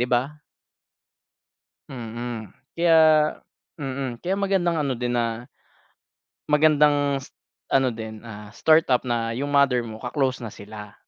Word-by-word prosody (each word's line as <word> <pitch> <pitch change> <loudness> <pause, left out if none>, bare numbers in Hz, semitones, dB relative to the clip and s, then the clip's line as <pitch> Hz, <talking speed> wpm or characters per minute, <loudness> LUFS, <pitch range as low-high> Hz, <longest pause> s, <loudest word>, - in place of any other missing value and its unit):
di - - +3
ba? 130 +5 0 1.5
Mm. 115 -3 -6 0.3
Kaya 170 -1 +4 0.8
mm. 130 -3 -4
Kaya 190 +2 0
magandang 190 -4 +1
ano 140 -2 0
din 120 0 -2
na 120 0 -1 1.0
magandang 145 -2 +3
s - - -17 0.4
ano 135 -1 +4
din, 110 -2 -7
ah, 105 -2 -10
startup 155 -2 +3
na 115 -1 -1
yung 140 +4 -3
mother 140 -3 +3
mo 110 -2 -7
ka-close 125 +1 -2
na 110 - -7
sila. 105 0 -10
125 Hz, 125 wpm, -24 LUFS, 115-145 Hz, 1.5 s, Kaya